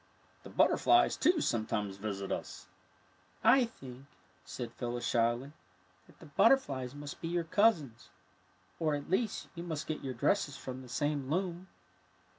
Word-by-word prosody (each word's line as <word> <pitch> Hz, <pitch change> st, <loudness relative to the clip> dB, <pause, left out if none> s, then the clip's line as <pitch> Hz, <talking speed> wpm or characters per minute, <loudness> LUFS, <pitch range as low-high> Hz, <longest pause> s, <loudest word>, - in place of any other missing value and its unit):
The -, -, -11 dB
butterflies, 355 Hz, 0 st, +4 dB
too, 330 Hz, +1 st, +3 dB
sometimes 105 Hz, -, -1 dB
visit 100 Hz, -1 st, -4 dB
us.'' -, -, -5 dB, 0.5 s
'' 95 Hz, 0 st, -33 dB, 0.2 s
I 250 Hz, -, +3 dB
think," 135 Hz, -, -11 dB, 0.4 s
said 120 Hz, -2 st, -7 dB
PhylUs, 120 Hz, 0 st, -4 dB
shyly, 120 Hz, +3 st, +1 dB, 0.3 s
" 90 Hz, 0 st, -34 dB
that -, -, -20 dB
the -, -, -14 dB
butterflies 145 Hz, -, +2 dB
must 145 Hz, 0 st, -8 dB
be 165 Hz, -, -3 dB
your 170 Hz, 0 st, 0 dB
cousins, 160 Hz, -, +1 dB, 0.7 s
or, 155 Hz, -3 st, +1 dB
at 145 Hz, +3 st, -6 dB
least, 215 Hz, +2 st, 0 dB
you 170 Hz, -, -7 dB
must 160 Hz, -4 st, -4 dB
get 155 Hz, -1 st, -4 dB
your 130 Hz, -2 st, -4 dB
dresses 140 Hz, -, +1 dB
from 130 Hz, 0 st, -7 dB
the 125 Hz, -, -12 dB
same 145 Hz, 0 st, -1 dB
loom." 180 Hz, +2 st, -2 dB
140 Hz, 155 wpm, -32 LUFS, 120-170 Hz, 0.7 s, butterflies